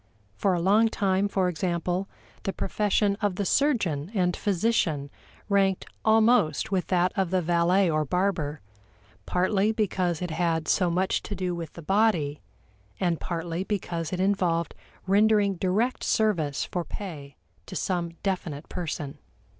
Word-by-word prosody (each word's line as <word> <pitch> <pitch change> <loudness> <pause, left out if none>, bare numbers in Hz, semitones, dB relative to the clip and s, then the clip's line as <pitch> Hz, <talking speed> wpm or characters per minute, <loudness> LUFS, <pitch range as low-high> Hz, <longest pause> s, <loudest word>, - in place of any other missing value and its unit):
For 185 - +1
a - - 0
long 205 +6 +4
time, 195 -2 +1
for 190 -2 +1
example, 180 +2 -1 0.3
the 195 - -2
profession 205 0 +1
of 205 -3 0
the 200 - -2
surgeon 190 - +1
and 180 -2 +2
physician 175 -8 0 0.4
ranked 195 -2 +2 0.2
almost 220 -7 +3
with 185 -2 0
that 180 0 +2
of 190 -3 0
the 185 +1 +2
valet 175 +3 +3
or 155 -2 +1
barber 160 -2 -1 0.7
partly 195 +3 +2
because 185 -6 0
it 180 -2 -4
had 165 -1 0
so 180 -2 +2
much 185 +3 +1
to 205 - -5
do 180 -1 -2
with 170 -3 -6
the 170 - -10
body, 185 -7 +1 0.6
and 175 -4 0
partly 170 0 -3
because 175 -5 -3
it 185 - -3
involved 185 -4 +1 0.3
rendering 205 +1 +4
direct 205 +8 0
service 175 - +1
for 175 - -3
pay 155 -8 -8 0.3
to - - -8
some 175 -3 -1
definite 170 -6 -3
person. 150 -4 -5
185 Hz, 145 wpm, -26 LUFS, 170-200 Hz, 0.7 s, long